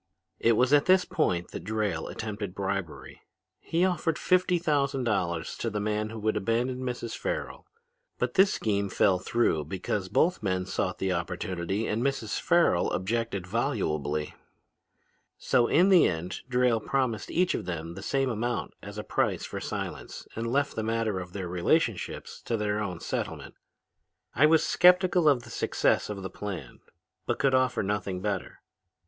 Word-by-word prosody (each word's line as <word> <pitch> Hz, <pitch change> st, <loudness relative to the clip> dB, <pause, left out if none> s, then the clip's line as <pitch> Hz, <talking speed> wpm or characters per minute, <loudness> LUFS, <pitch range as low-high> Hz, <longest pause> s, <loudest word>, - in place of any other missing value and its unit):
"It 115 Hz, -, +4 dB
was 125 Hz, +5 st, +3 dB
at 145 Hz, -1 st, +5 dB
this 185 Hz, 0 st, +5 dB
point 90 Hz, -, 0 dB
that -, -, -6 dB
Drayle 105 Hz, -5 st, -2 dB
attempted 105 Hz, -3 st, -5 dB
bribery. 95 Hz, -4 st, -4 dB, 0.4 s
He 170 Hz, +3 st, +1 dB
offered 170 Hz, -3 st, 0 dB
fifty 180 Hz, -1 st, +2 dB
thousand 140 Hz, -5 st, 0 dB
dollars 90 Hz, -7 st, -1 dB
to 115 Hz, -, -2 dB
the 105 Hz, -1 st, -3 dB
man 105 Hz, +1 st, -1 dB
who 115 Hz, -, -7 dB
would 110 Hz, +1 st, +1 dB
abandon 120 Hz, +5 st, 0 dB
Mrs. 125 Hz, -2 st, -4 dB
Farrel. -, -, -4 dB, 0.5 s
But -, -, -1 dB
this 190 Hz, 0 st, +5 dB
scheme 100 Hz, -2 st, 0 dB
fell 95 Hz, -1 st, +3 dB
through 90 Hz, -8 st, +1 dB
because 95 Hz, +3 st, -3 dB
both 180 Hz, -, +2 dB
men 95 Hz, -2 st, -1 dB
sought 95 Hz, 0 st, -2 dB
the 95 Hz, -, -1 dB
opportunity 90 Hz, +3 st, -2 dB
and 110 Hz, +2 st, -1 dB
Mrs. 130 Hz, -6 st, -1 dB
Farrel -, -, +3 dB
objected 100 Hz, 0 st, -2 dB
volubly. 75 Hz, -, -1 dB, 1.0 s
"So 120 Hz, -1 st, +2 dB
in 180 Hz, +5 st, +4 dB
the 185 Hz, -3 st, +7 dB
end 85 Hz, +2 st, -3 dB
Drayle 125 Hz, -2 st, +3 dB
promised 130 Hz, -4 st, -1 dB
each 180 Hz, +1 st, +2 dB
of -, -, -3 dB
them 85 Hz, -2 st, -4 dB
the 95 Hz, -, -8 dB
same 135 Hz, +4 st, 0 dB
amount 120 Hz, +1 st, -2 dB
as -, -, -9 dB
a -, -, -4 dB
price -, -, 0 dB
for -, -, -5 dB
silence -, -, -6 dB
and 115 Hz, +1 st, -3 dB
left 140 Hz, +2 st, +1 dB
the 110 Hz, -, -1 dB
matter 110 Hz, -3 st, -1 dB
of 90 Hz, -1 st, -7 dB
their 95 Hz, -3 st, -4 dB
relationships 90 Hz, -, -1 dB
to 115 Hz, -, 0 dB
their 105 Hz, 0 st, -1 dB
own 90 Hz, -5 st, -4 dB
settlement. -, -, -4 dB, 0.8 s
"I 150 Hz, +5 st, +5 dB
was 160 Hz, 0 st, +4 dB
skeptical 180 Hz, -2 st, +5 dB
of 130 Hz, -4 st, +2 dB
the -, -, -12 dB
success -, -, +1 dB
of 100 Hz, -2 st, -5 dB
the 95 Hz, -, -5 dB
plan 100 Hz, -2 st, -6 dB, 0.5 s
but -, -, 0 dB
could 135 Hz, -1 st, +2 dB
offer 130 Hz, -3 st, +2 dB
nothing 100 Hz, -2 st, -2 dB
better. 100 Hz, -2 st, -3 dB
110 Hz, 165 wpm, -28 LUFS, 95-135 Hz, 1.0 s, the